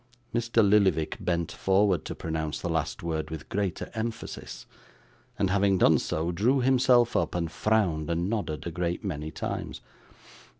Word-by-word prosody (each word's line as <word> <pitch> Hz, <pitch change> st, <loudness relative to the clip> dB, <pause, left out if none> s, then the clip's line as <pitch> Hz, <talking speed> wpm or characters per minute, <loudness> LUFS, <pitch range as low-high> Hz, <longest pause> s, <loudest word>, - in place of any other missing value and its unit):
Mr. 115 Hz, -2 st, +2 dB
Lillyvick 95 Hz, -6 st, +3 dB
bent 85 Hz, -2 st, -1 dB
forward 95 Hz, -2 st, +2 dB
to -, -, -5 dB
pronounce 80 Hz, -2 st, -3 dB
the -, -, -3 dB
last -, -, -2 dB
word 80 Hz, -2 st, -2 dB
with 80 Hz, -2 st, -7 dB
greater 100 Hz, -3 st, -2 dB
emphasis; 115 Hz, +1 st, -5 dB, 0.7 s
and 100 Hz, -2 st, +1 dB
having 100 Hz, 0 st, +3 dB
done -, -, +5 dB
so, 80 Hz, +2 st, -2 dB
drew 120 Hz, +10 st, +2 dB
himself 125 Hz, -2 st, +4 dB
up, -, -, 0 dB
and 85 Hz, -2 st, -2 dB
frowned 85 Hz, -3 st, +1 dB
and 85 Hz, +1 st, 0 dB
nodded 100 Hz, -8 st, -3 dB
a 85 Hz, -, -3 dB
great 85 Hz, +3 st, -2 dB
many 80 Hz, -6 st, -4 dB
times. -, -, -5 dB
95 Hz, 155 wpm, -27 LUFS, 80-110 Hz, 0.7 s, done